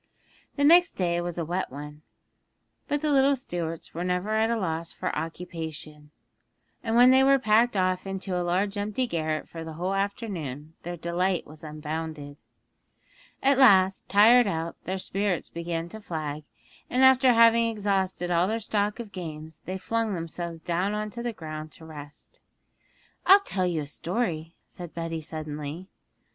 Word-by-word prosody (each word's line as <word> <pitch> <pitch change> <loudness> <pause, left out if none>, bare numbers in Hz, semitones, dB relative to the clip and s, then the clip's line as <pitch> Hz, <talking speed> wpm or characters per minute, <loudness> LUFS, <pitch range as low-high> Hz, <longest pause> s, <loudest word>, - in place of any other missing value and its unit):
The 285 - 0
next 345 +4 +6
day 175 -2 0
was 175 -1 -4
a 170 - -2
wet 180 0 -2
one, 150 +2 -9 0.9
but 290 -1 -1
the 305 - +2
little 275 0 +4
Stuarts 170 - -5
were 170 - -3
never 180 +3 -1
at 220 +1 +2
a 235 - +1
loss 165 -4 -3
for - - -3
occupation, 160 -3 -6 0.7
and 225 -1 -1
when 245 +2 +8
they 265 +1 +6
were 275 0 +6
packed 225 -1 +3
off 185 0 0
into 195 -1 -4
a 180 - 0
large 195 +4 0
empty 210 +5 -1
garret 155 -7 -2
for 165 -1 -8
the 160 0 -7
whole 180 +4 -2
afternoon 180 - -3
their 175 +1 -6
delight 175 +2 0
was 155 +1 -13
unbounded. 155 -1 -6 1.1
At 275 0 +4
last, 195 -7 +5
tired 225 +4 +6
out, 165 -3 -2
their 190 +1 -2
spirits 195 -1 -2
began 170 0 -3
to 220 +4 -9
flag, 155 -5 -5 0.4
and 255 +2 +2
after 260 -1 +6
having 230 0 +5
exhausted 195 -4 -1
all 175 +1 +3
their 225 +2 -1
stock 210 0 -1
of 225 -4 -7
games 160 -4 -8
they 185 +1 -3
flung 225 +1 -1
themselves 165 -1 -5
down 180 +4 0
on 215 0 -3
the 235 +2 -4
ground 155 -5 -7
to 160 - -14
rest. 150 -2 -10 0.9
'I'll 395 +1 +9
tell 185 - -1
you 165 -3 -1
a - - -5
story,' 165 +1 -3
said 175 -2 -10
Betty 165 -1 -3
suddenly. 155 +3 -6
180 Hz, 165 wpm, -27 LUFS, 160-215 Hz, 1.1 s, I'll